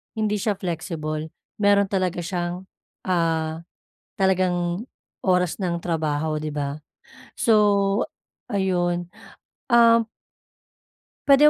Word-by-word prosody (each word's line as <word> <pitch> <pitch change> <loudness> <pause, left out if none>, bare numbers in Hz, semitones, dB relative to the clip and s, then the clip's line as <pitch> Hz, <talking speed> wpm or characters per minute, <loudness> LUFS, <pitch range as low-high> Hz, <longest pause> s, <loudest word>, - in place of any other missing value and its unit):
hindi 215 -1 0
siya 205 0 0
flexible 160 -4 -3 0.3
meron 200 -1 +4
talaga 185 -3 0
siyang, 175 +1 -3 0.4
ah, 165 -2 0 0.6
talagang 185 0 +1 0.4
oras 180 -2 +2
ng 175 -3 -2
trabaho, 155 -2 -1
'di 155 0 -3
ba? 145 -1 -2 0.7
So, 205 -2 +4 0.5
ayun. 175 -3 0 0.6
Um 230 -1 +6 1.2
puwede 280 +1 +7
180 Hz, 90 wpm, -24 LUFS, 165-200 Hz, 1.2 s, puwede